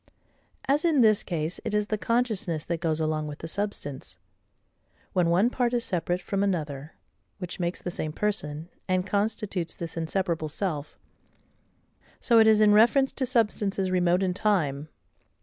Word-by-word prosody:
As 285 +3 +2
in 320 -6 +3
this 215 -3 +5
case 165 -1 -3
it 220 -3 -2
is 210 0 +2
the 215 - -1
consciousness 215 -10 0
that 170 -1 -2
goes 160 -2 0
along 155 -1 -1
with 145 -1 -7
the 165 - -7
substance, 145 - -4 1.0
when 175 -2 +2
one 190 +8 +3
part 245 -1 0
is 235 - -1
separate 175 0 -1
from 195 -1 -1
another, 155 -7 -2 0.4
which 180 -1 -7
makes 175 0 -3
the 175 - -3
same 155 -2 -4
person, 165 -4 -3 0.2
and 185 -1 +1
constitutes 205 -4 -2
this 170 -1 -6
inseparable 165 -1 -1
self: 155 -3 -4 1.2
so 235 -2 +4
it 220 - +6
is 215 -1 +5
in 210 -1 +6
reference 240 +6 +5
to 260 - -2
substances 205 -5 +1
remote 180 0 +2
in 185 -1 0
time. 160 -8 0
185 Hz, 160 wpm, -27 LUFS, 160-215 Hz, 1.2 s, it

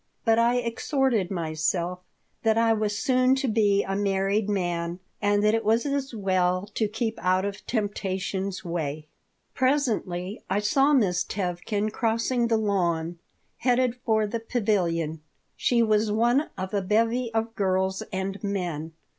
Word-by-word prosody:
But 225 -1 +4
I 235 +1 +3
exhorted 240 -3 0
myself 170 +1 -1 0.4
that 220 -1 +2
I 230 0 +4
was 210 -1 -1
soon 255 +2 +3
to 270 0 -1
be 205 -3 +3
a 195 - -3
married 200 +1 0
man 175 -3 -1 0.2
and 205 0 +2
that 210 0 +4
it 225 - +1
was 225 +4 +2
as 280 -1 -1
well 185 -3 +1
to 220 - +1
keep 220 +1 -3
out 185 +1 +2
of 200 0 -5
temptation's 195 -3 -2
way 155 -3 -3 0.5
Presently 225 -9 0
I 190 - +1
saw 270 +8 +3
Miss 190 -10 +3
Tevkin 200 +3 -2
crossing 230 +2 0
the 230 -1 +2
lawn, 175 -5 0 0.4
headed 250 -1 +2
for 220 -2 +2
the 230 +3 -3
pavilion. 180 -9 0 0.3
She 235 -2 +2
was 215 -1 +2
one 240 +7 +2
of 185 +2 -5
a 200 - +1
bevy 230 +5 +1
of 225 0 0
girls 190 -1 0
and 195 +1 -3
men. 175 -6 -3
205 Hz, 145 wpm, -26 LUFS, 185-230 Hz, 0.5 s, But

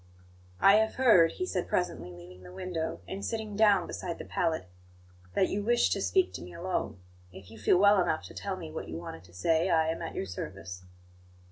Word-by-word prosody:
"I 200 +1 +7
have 220 0 +1
heard," 215 -11 +5
he 365 - -3
said 185 - -2
presently, 180 - -1
leaving 90 +1 -12
the 90 -1 -12
window, 165 - -4
and 195 +1 -6
sitting 220 -2 -3
down 200 -4 +4
beside 170 - -5
the - - -8
pallet, 160 - -1 0.7
"that 190 - +3
you 205 - -2
wish 240 +3 +2
to - - 0
speak 375 -1 +2
to - - -6
me - - -10
alone. 180 - -3 0.3
If 95 +2 -13
you 110 - -12
feel 105 - +4
well 200 0 +6
enough 170 -3 0
to - - -10
tell 195 -2 -4
me 165 -3 -8
what 160 - -6
you 80 - -5
wanted 85 0 -8
to 85 - -19
say, 160 - +2
I 160 -2 +3
am 165 - -3
at 165 - -5
your - - -2
service." 90 -1 -7
170 Hz, 215 wpm, -29 LUFS, -, 0.7 s, I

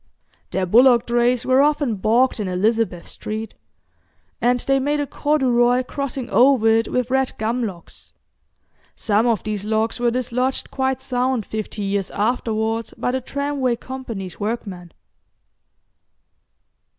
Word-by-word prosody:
Their 190 - -1
bullock 240 +4 +5
drays 240 0 +1
were 260 +1 +4
often 290 -4 +2
bogged 230 +6 +2
in 205 - -2
Elizabeth 195 0 0
Street, 215 0 -5 0.9
and 245 +1 +3
they 270 0 +2
made 290 +2 0
a 290 - 0
corduroy 255 -4 +2
crossing 265 -1 -4
over 255 -2 +5
it 225 +1 +3
with 250 0 -1
red 265 0 +1
gum 230 +3 -1
logs. 185 -6 -7 0.8
Some 215 +2 +1
of 230 -4 +1
these 210 -2 -3
logs 220 +2 -1
were 240 0 +2
dislodged 250 +2 -1
quite 265 -1 -1
sound 250 -3 0
fifty 215 -1 -5
years 195 -1 -1
afterwards 225 0 -1
by 245 - -1
the 260 +1 -2
Tramway 280 -2 -1
Company's 230 -8 -7
workmen. 200 -5 -4
240 Hz, 130 wpm, -21 LUFS, 215-260 Hz, 0.9 s, bullock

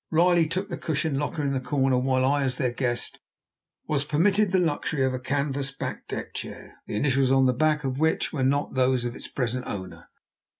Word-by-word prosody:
Riley 170 0 +4
took 185 +5 -3
the 170 - -5
cushioned 155 -2 -1
locker 145 +1 -2
in 140 -1 0
the 135 - 0
corner, 130 -1 +1
while 130 0 +2
I, 140 +2 +2
as 130 -2 0
their 130 -4 0
guest, 120 -1 -2 0.7
was 145 -2 +1
permitted 190 +7 +2
the 190 - +3
luxury 160 -4 0
of 130 - 0
a 130 - -2
canvas 140 +1 -1
backed 135 - -6
deck - - -5
chair, - - -8
the - - -4
initials 135 +2 +2
on 135 0 +5
the 125 - +3
back 150 +3 +1
of 135 0 -2
which 160 +1 +1
were 145 - -2
not 140 +2 +1
those 130 -1 +2
of 120 - -3
its - - -7
present 125 -1 -2
owner. 95 -2 -7
140 Hz, 210 wpm, -26 LUFS, 130-155 Hz, 0.7 s, on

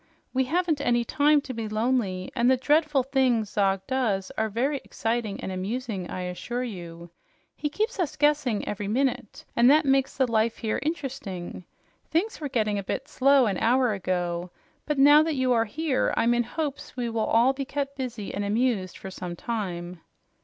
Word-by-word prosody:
"We 260 0 +2
haven't 325 +1 0
any 240 -3 +2
time 295 +4 +3
to 260 - -7
be 225 -2 -4
lonely, 215 -5 -1
and 245 0 +3
the 260 - +4
dreadful 295 0 +2
things 250 -5 +1
Zog 195 -2 +1
does 215 -7 -1
are 220 0 0
very 265 +6 -1
exciting 225 -2 -2
and - - -5
amusing, 195 0 -4
I 185 - -4
assure 180 +7 -4
you. 170 -6 -8 0.4
He 295 - -2
keeps 435 +8 -2
us 340 -6 -1
guessing 290 -7 +1
every 205 0 -3
minute, 250 -1 -1
and 240 +1 +6
that 300 +2 +5
makes 270 -1 +2
the 260 - +4
life 225 -1 +1
here 220 -2 -1
interesting. 265 - -5 0.4
Things 355 +4 -1
were 290 - -3
getting 215 -5 0
a - - -5
bit - - -4
slow 275 0 +4
an 195 -5 -1
hour 245 0 +3
ago, 180 -2 -2 0.4
but 300 -1 0
now 290 +2 +8
that 315 -1 0
you 260 -1 +2
are 230 -1 +2
here, 285 +3 0
I'm 235 +1 +3
in 240 0 +1
hopes 285 0 -5
we 245 -1 -1
will 225 -1 -1
all 240 +4 +4
be 275 +1 -4
kept 280 0 -3
busy 245 -6 -5
and 205 - -2
amused 210 -3 0
for 190 - -8
some 180 -2 -6
time." 180 -5 -4
240 Hz, 185 wpm, -26 LUFS, 205-275 Hz, 0.4 s, now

